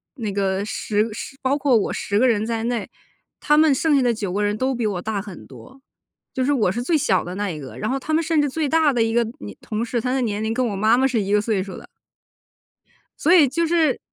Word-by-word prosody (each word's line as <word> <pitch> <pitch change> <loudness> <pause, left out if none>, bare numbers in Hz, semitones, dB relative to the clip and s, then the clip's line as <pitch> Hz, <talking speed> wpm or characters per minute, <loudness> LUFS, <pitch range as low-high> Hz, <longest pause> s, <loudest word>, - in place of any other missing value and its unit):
那 225 -6 -4
个 195 0 -1
10 215 0 -1
10 270 - -8
包 270 +2 +1
括 270 -4 +3
我 210 - -1
10 205 0 -1
个 255 - +4
人 220 -3 +1
在 225 -1 -2
内， 235 -4 -2 0.5
她 295 - +2
们 310 -1 +5
剩 300 +3 +2
下 275 - +4
的 245 -2 +2
9 200 -4 -4
个 205 +2 0
人 205 +1 0
都 260 +3 0
比 235 -2 -2
我 195 -4 -2
大 210 0 -3
很 195 -4 -11
多， 265 +1 -14 0.5
就 260 - -1
是 275 - +1
我 235 -9 +2
是 240 +4 -3
最 315 +5 +2
小 190 -10 +1
的 180 +1 -7
那 205 -1 -2
一 160 - -5
个， 135 -3 -9
然 215 - -3
后 265 - 0
她 275 +3 -6
们 320 - +3
甚 320 -1 +1
至 290 - 0
最 305 +1 -2
大 315 0 +3
的 245 -3 0
一 225 0 +1
个 235 - +3 0.2
年 100 -2 -9
同 215 +1 -3
事， 235 0 -2
她 250 - -2
的 265 - 0
年 215 -4 -2
龄 220 +1 -1
跟 250 0 0
我 205 - -3
妈 215 +4 +3
妈 265 +1 +3
是 240 -4 0
一 200 0 -3
个 210 - +4
岁 205 -3 -1
数 195 - -9
的。 - - -12 1.3
所 330 - +3
以 325 -6 +7
就 335 +6 0
是 320 -5 +2
235 Hz, 270 characters per minute, -22 LUFS, 205-270 Hz, 1.3 s, 以